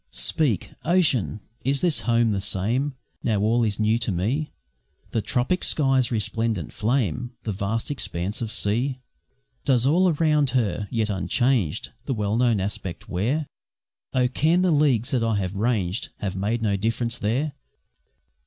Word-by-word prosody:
Speak, 140 - 0
Ocean! 135 - +2 0.2
is 135 +3 0
my 170 -4 +1
Home 115 -1 +3
the 100 -2 -1
same 115 +9 0 0.3
Now 110 -4 +1
all 115 +3 +3
is 105 -2 -1
new 110 +2 +2
to 120 -2 0
me? 115 - -1 0.6
The 115 - 0
tropic 125 - 0
sky's 135 -4 +2
resplendent 110 -4 -1
flame, 120 - 0
The 110 - -2
vast 105 +6 -2
expanse 105 -4 -3
of 110 -2 -3
sea? 115 +6 0 0.7
Does 125 -2 +3
all 180 +6 +4
around 150 -3 +2
her, 105 -3 0
yet 110 -2 0
unchanged, 105 - 0
The 135 - -1
well 105 -1 0
known 120 -3 +3
aspect 95 -2 -4
wear? 120 - 0 0.7
Oh! 125 -1 +2
can 160 +8 +2
the 185 - +3
leagues 140 -6 +3
that 125 - +1
I 115 -1 +1
have 95 -2 -1
ranged 105 -3 0
Have 95 -2 -3
made 110 +4 -1
no 100 -2 +2
difference 115 +3 -1
there? 130 +8 0
115 Hz, 155 wpm, -24 LUFS, 105-135 Hz, 0.7 s, all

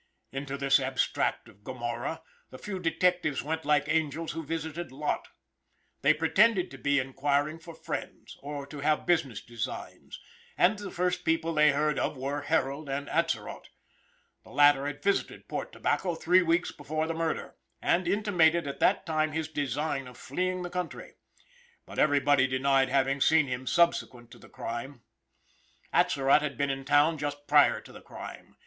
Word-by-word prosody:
Into 135 +1 -4
this 140 0 +4
abstract 135 0 -1
of 100 - -19
Gomorrah 120 +6 -4 0.3
the 130 - -10
few 190 +5 -5
detectives 175 -3 +1
went 160 +2 -3
like 150 -2 +2
angels 160 0 -1
who 165 - -5
visited 160 +1 -4
Lot. 150 +3 -2 0.7
They 140 - +5
pretended 185 +5 +3
to 135 - -10
be 140 +2 +1
enquiring 145 +3 0
for 165 0 -11
friends, - - -6
or 145 0 -6
to 145 +1 -9
have 150 +1 +1
business 160 - +1
designs, 115 -3 -7 0.4
and 200 +4 +3
the 205 -2 -6
first 180 0 -1
people 165 0 0
they 150 -1 +5
heard 150 +1 +1
of - - -1
were 140 +3 -3
Harold 145 -1 -1
and 140 +1 -3
Atzerott. 165 0 -2 0.8
The - - -17
latter 145 -1 +4
had 145 0 -6
visited 200 0 -1
Port - - -4
Tobacco 175 -3 -1
three 180 +3 +4
weeks 170 0 +1
before 155 +2 -3
the 165 - -2
murder, 165 0 -3 0.2
and 175 0 +1
intimated 175 -5 +3
at 140 - -5
that - - +2
time 155 -1 0
his 160 -1 -2
design 145 -1 -2
of 125 -1 -12
fleeing 185 +5 -2
the 175 - -6
country. 180 -1 -5 0.7
But - - -7
everybody 145 -2 +4
denied 135 0 +2
having 135 +1 +1
seen 160 0 +5
him 125 0 -5
subsequent 130 -8 +1
to - - -13
the - - -16
crime. 120 +2 -6 0.9
Atzerott 135 +2 +4
had 150 -2 -3
been 140 -1 0
in 135 0 -5
town 150 +3 +3
just 145 0 -4
prior 145 0 +5
to - - -15
the - - -12
crime. - - -10
150 Hz, 165 wpm, -29 LUFS, 140-165 Hz, 0.9 s, They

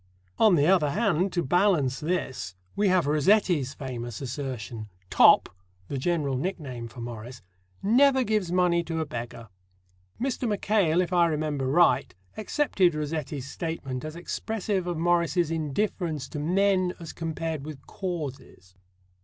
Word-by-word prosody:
On 215 -5 +6
the 145 -2 +3
other 175 -4 +4
hand, 190 0 +1
to 175 - 0
balance 165 -5 +2
this, 135 - -3 0.2
we 205 - +2
have 185 -4 +3
Rossetti's 150 -2 +2
famous 120 -4 -6
assertion: 120 -5 -5 0.2
"Top" - - +6 0.4
the 140 - -3
general 150 -3 0
nickname 130 -6 -4
for 115 +1 -10
Morris 120 0 -8 0.4
"never 265 +5 +4
gives 215 -6 0
money 175 -1 +2
to 165 0 -3
a 160 - -1
beggar." 115 -3 -7 0.7
Mr. 255 -2 -1
Mackail, 200 -5 +2
if 180 0 -3
I 175 -1 +5
remember 150 -4 -1
right, 170 - +3 0.2
accepted 200 - +1
Rossetti's 150 -3 -4
statement 140 -4 -5
as 155 +1 -6
expressive 195 +1 -3
of 175 -2 -2
Morris's 170 0 +1
indifference 160 0 -2
to 150 - -5
men 185 +3 +2
as 165 -2 -8
compared 160 -2 -4
with 145 -2 -9
causes. 140 - -6
160 Hz, 135 wpm, -27 LUFS, 135-185 Hz, 0.7 s, On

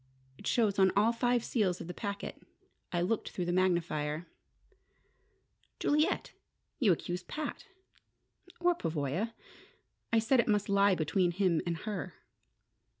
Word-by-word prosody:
It - - -8
shows 210 -5 +2
on 190 -1 +6
all 220 +3 +4
five 245 0 +1
seals 195 -9 0
of - - -6
the 180 - -6
packet. 200 0 -5 0.5
I 175 - 0
looked 205 +5 0
through 180 - -3
the 175 - 0
magnifier." 170 -4 0 1.5
"Juliet! 300 +2 +1 0.5
You 225 -9 +5
accuse 175 +1 -1
Pat 300 - -5 0.5
" 360 - -26
"Or 355 0 +4
Pavoya. 165 - -2 0.8
I 230 - +4
said 235 +4 +3
it - - +3
must 210 -2 +1
lie 200 -1 +4
between 175 +3 +1
him 175 -2 +1
and 170 -1 -1
her." 195 -5 -4
195 Hz, 140 wpm, -32 LUFS, 175-225 Hz, 1.5 s, on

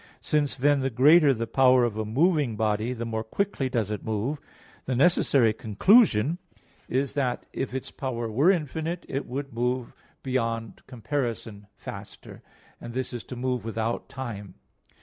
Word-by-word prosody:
Since 145 -2 0
then 145 +2 +3
the 135 0 0
greater 145 +5 +6
the 115 -3 -1
power 130 0 +4
of 120 -3 0
a 110 - -2
moving 145 - +2
body, 110 +2 0
the 120 -2 -4
more 110 -1 -3
quickly 135 - -2
does 115 -5 -1
it 105 - -4
move; 110 +7 -2 0.5
the 130 - 0
necessary 135 -5 +4
conclusion 140 - +3 0.5
is 135 +2 0
that 130 -4 -1
if 130 -1 -3
its 130 - -5
power 120 -4 -4
were 130 +11 +3
infinite, 165 0 -1
it 135 - -3
would 135 +1 -5
move 125 +1 -2 0.3
beyond 115 -4 -2
comparison 115 -5 -4
faster, - - -10 0.4
and 120 - -9
this 130 -1 -3
is 120 - -5
to 125 - -7
move 125 0 -2
without 115 +1 -3
time. 105 -8 -7
125 Hz, 155 wpm, -26 LUFS, 115-140 Hz, 0.5 s, greater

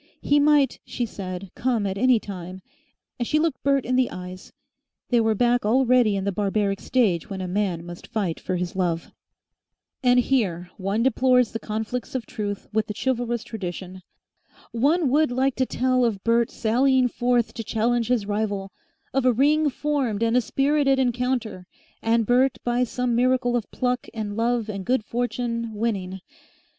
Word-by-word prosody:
He 290 +1 +3
might, 290 -3 +3
she 245 - -3
said, 185 -3 -7
come 235 -4 0
at 190 -1 -2
any 250 +3 +4
time, 185 -2 -8 0.6
and 240 - -1
she 305 - +2
looked 310 -4 0
Bert 275 -1 +2
in 255 - 0
the 255 -1 +2
eyes. 185 0 -9 0.6
They 240 -2 +3
were 220 -1 +2
back 245 +2 +2
already 245 -1 +3
in 195 - -2
the 200 - 0
barbaric 200 0 0
stage 215 -9 +1
when 195 -2 -5
a 185 - -3
man 180 -3 -1
must 175 0 -9
fight 195 -7 -2
for 185 - -3
his 180 0 -3
love. 170 -3 -1 0.9
And 250 -2 +4
here 185 -9 0
one 200 +3 -1
deplores 250 -1 +3
the 225 - -4
conflicts 220 +4 -4
of 255 - -2
truth 205 -2 -5
with 215 0 +1
the 210 - -5
chivalrous 240 -1 -1
tradition. 185 -4 -6 0.7
One 285 +5 +2
would 305 +2 +3
like 260 +2 +1
to 260 -1 +1
tell 255 0 +1
of 215 -5 0
Bert 230 0 +2
sallying 255 +3 +2
forth 245 -1 0
to 225 - -5
challenge 230 +2 0
his 240 -4 +1
rival, 205 -2 -2 0.4
of 270 0 +1
a 255 - +5
ring 295 +5 +3
formed 265 -6 -1
and 230 +1 +2
a 250 - +5
spirited 275 +2 +2
encounter, 245 -6 -1 0.3
and 230 0 +2
Bert 250 +3 +3
by 240 +1 +1
some 250 0 -1
miracle 250 0 +2
of 235 -4 -2
pluck 250 -1 -2
and 210 -2 -4
love 230 0 0
and 200 -3 -5
good 245 0 0
fortune 235 -1 -2
winning. 195 -4 -2
235 Hz, 170 wpm, -24 LUFS, 205-255 Hz, 0.9 s, a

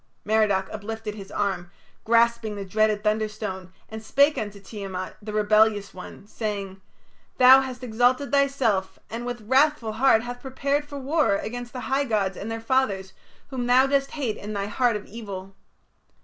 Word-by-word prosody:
Merodach 210 -3 +2
uplifted 215 0 -5
his 200 -2 -10
arm, 195 -4 -2 0.4
grasping 235 -1 +2
the 200 -1 -5
dreaded 215 +1 +1
thunderstone, 210 -3 -2 0.2
and 220 0 -8
spake 280 +6 +3
unto 205 -1 -5
Tiamat, 195 -2 -6
the 210 0 -6
rebellious 215 -1 +3
one, 185 +2 -10
saying: 200 -3 -5 0.6
"Thou 260 +1 +8
hast 255 -1 -6
exalted 245 +3 +1
thyself, 240 -9 +1
and 235 +2 -5
with 245 -1 -4
wrathful 265 -3 +3
heart 225 0 +3
hath 245 0 -7
prepared 280 +2 -1
for 285 -1 -8
war 280 -5 +1
against 240 +4 -5
the 255 - -6
high 270 +2 0
gods 205 -6 0
and 205 - -6
their 225 0 -3
fathers, 225 -6 0 0.4
whom 250 -2 -3
thou 255 +2 +6
dost 275 0 +1
hate 255 -8 -2
in 210 +1 -6
thy 200 -1 -2
heart 235 +3 +1
of 210 - -5
evil. 195 -3 -8
220 Hz, 165 wpm, -25 LUFS, 205-255 Hz, 0.6 s, Thou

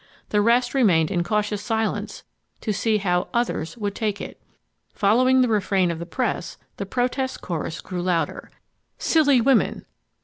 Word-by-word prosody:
The 210 - +2
rest 240 +3 +3
remained 185 - +3
in 175 -3 +1
cautious 210 +2 -1
silence 225 -1 -2 0.4
to 215 - -1
see 215 +2 +1
how 180 -3 0
"others" 235 -5 -1
would 205 -3 -2
take 210 -1 -2
it. - - -8 0.5
Following 255 +5 +4
the 250 - +3
refrain 195 -4 +1
of 165 - -5
the 170 - -6
press, 230 -4 -2 0.2
the 200 - -4
protest 255 +3 -1
chorus 165 -2 -4
grew 180 -1 -5
louder. 170 -4 -1 0.5
"Silly 290 -5 +3
women" 260 -1 +2
210 Hz, 150 wpm, -23 LUFS, 180-245 Hz, 0.5 s, Following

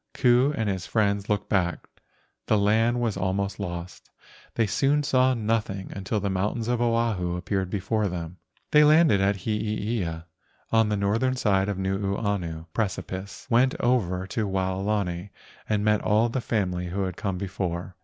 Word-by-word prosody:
Ku 125 +2 +4
and 110 - 0
his 95 -2 -2
friends 100 -2 0
looked 105 -1 0
back, 90 -4 0 0.6
the 110 - +3
land 110 +4 +2
was 115 -4 0
almost 100 +2 -1
lost; 85 -2 -6 0.5
they 115 - +2
soon 140 +7 +2
saw 130 -3 +3
nothing 105 -4 -2
until 100 +3 -2
the 100 - -2
mountains 105 +4 -1
of 120 -1 0
Oahu 115 -7 +1
appeared 95 +1 -2
before 105 +2 0
them. 85 -1 -5 0.3
They 150 0 +7
landed 150 -8 +5
at 100 +1 +2
Heeia 105 -5 -2 0.5
on 110 -1 +4
the 105 - 0
northern 115 +6 +1
side 100 -5 +1
of 100 - -2
the 95 - -3
Nuuanu 95 -4 -2
precipice, 95 -2 -4
went 130 +1 +3
over 95 -7 +1
to 105 +2 -2
Waolani, 95 -1 -1 0.4
and 105 -1 +1
met 105 -1 +3
all 110 +3 +2
the 130 +2 -2
family 90 -6 -1
who 95 +3 -2
had 95 -2 -3
come 95 -2 -3
before. 90 -2 -4
100 Hz, 160 wpm, -26 LUFS, 95-115 Hz, 0.6 s, They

